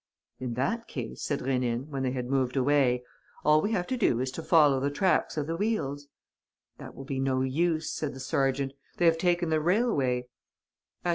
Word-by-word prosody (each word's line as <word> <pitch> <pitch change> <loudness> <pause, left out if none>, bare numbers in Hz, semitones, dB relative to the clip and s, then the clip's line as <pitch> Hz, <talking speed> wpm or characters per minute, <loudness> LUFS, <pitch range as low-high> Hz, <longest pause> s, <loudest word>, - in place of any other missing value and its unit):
"In 125 -2 -4
that 230 - -1
case," - - -6
said 145 - -2
Rénine, 125 -1 -1
when 140 -2 -3
they 130 - 0
had 125 -1 -3
moved 130 0 0
away, 130 -2 +3 0.4
"all 155 0 +5
we 205 - -1
have 180 -4 0
to 255 - -2
do 125 - +2
is 130 0 -1
to 165 - -6
follow 150 -5 +4
the 140 +2 0
tracks 180 +3 +1
of 150 - 0
the 165 +2 -3
wheels." 145 -9 -2 0.7
"That - - -10
will 135 - -9
be 135 -1 -3
no 135 -1 +1
use," 160 +4 0
said 150 -3 -3
the - - -9
sergeant. 135 +1 0 0.2
"They 175 - +2
have 165 -1 +4
taken 175 -1 +1
the 155 -1 +2
railway." 150 - +1
140 Hz, 195 wpm, -28 LUFS, 130-165 Hz, 0.7 s, all